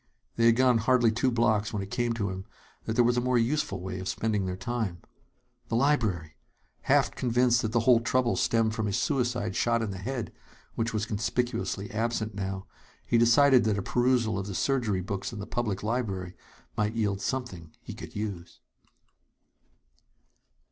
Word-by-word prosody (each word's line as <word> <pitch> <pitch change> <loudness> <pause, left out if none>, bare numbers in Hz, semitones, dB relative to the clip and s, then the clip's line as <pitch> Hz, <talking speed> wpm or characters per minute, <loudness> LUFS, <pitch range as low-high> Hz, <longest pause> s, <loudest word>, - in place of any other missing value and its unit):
They 115 0 +4
had 115 - +6
gone 125 -1 +4
hardly 120 0 +3
two 125 +4 +1
blocks 110 -3 +1
when 100 -2 -3
it 95 - -10
came 120 -1 0
to 105 -4 -2
him 95 0 -6 0.4
that 110 - -2
there 120 - +5
was 120 +1 +2
a - - +2
more 125 0 +1
useful 115 -4 0
way 95 +1 -5
of 95 - -6
spending 105 -3 -1
their 90 0 -3
time. 105 -2 -3 0.7
The - - -2
library! 110 - +1 0.5
Half - - +4
convinced 125 0 +2
that 110 - -2
the 115 0 +2
whole 120 0 +5
trouble 120 +1 +1
stemmed 115 -1 +1
from 110 -2 -2
his 100 - 0
suicide 120 -6 -1
shot 115 -1 +1
in 105 - -3
the 95 - -6
head 125 +3 -4 0.4
which 115 0 -1
was 110 -1 -1
conspicuously 110 0 -2
absent 110 -1 -1
now 95 -1 -4 0.4
he 115 - +2
decided 130 +2 +5
that 105 -2 +1
a 100 - -2
perusal 120 -4 +1
of 95 - -5
the 100 - -5
surgery 115 -8 0
books 95 +1 -4
in 115 - -8
the 100 - -5
public 110 -4 -2
library 100 -6 -2 0.4
might 105 +2 -1
yield 100 -3 0
something 100 -12 -4
he - - -7
could - - -10
use. 100 -5 -5
115 Hz, 180 wpm, -28 LUFS, 100-120 Hz, 0.7 s, had